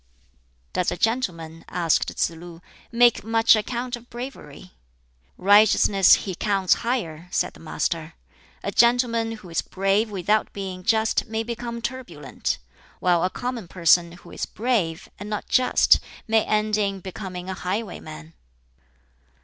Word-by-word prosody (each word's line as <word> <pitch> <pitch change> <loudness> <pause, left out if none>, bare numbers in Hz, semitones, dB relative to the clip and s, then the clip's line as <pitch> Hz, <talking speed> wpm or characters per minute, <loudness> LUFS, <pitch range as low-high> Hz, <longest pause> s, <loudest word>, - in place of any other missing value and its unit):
"Does 180 - +1
a - - -4
gentleman," 165 -9 -2
asked 170 -3 +1
Tsz - - 0
lu, 165 0 -11 0.3
"make 240 0 +4
much 225 0 +4
account 240 +3 -3
of 240 0 -15
bravery?" 235 - -9 0.7
"Righteousness 200 -1 +5
he 190 - -3
counts 195 0 +2
higher," 180 -10 -3
said - - -1
the - - -16
Master. 165 0 -3 0.5
"A - - -2
gentleman 235 -1 +3
who 210 -5 -11
is 165 - 0
brave 195 +3 0
without 205 +2 0
being 190 -2 -6
just 220 +5 +1
may 220 0 -2
become 235 0 -5
turbulent; 230 - -4 0.4
while 175 -2 +2
a 185 - +2
common 245 -3 -5
person 170 -1 +3
who 175 - -14
is - - -4
brave 200 -8 -1
and 205 +1 -7
not 210 -1 -4
just 255 - +4 0.3
may 220 0 +3
end 215 0 +1
in 200 -2 -1
becoming 185 -1 -7
a 190 - -3
highwayman." 180 - -5
200 Hz, 140 wpm, -24 LUFS, 175-230 Hz, 0.7 s, Righteousness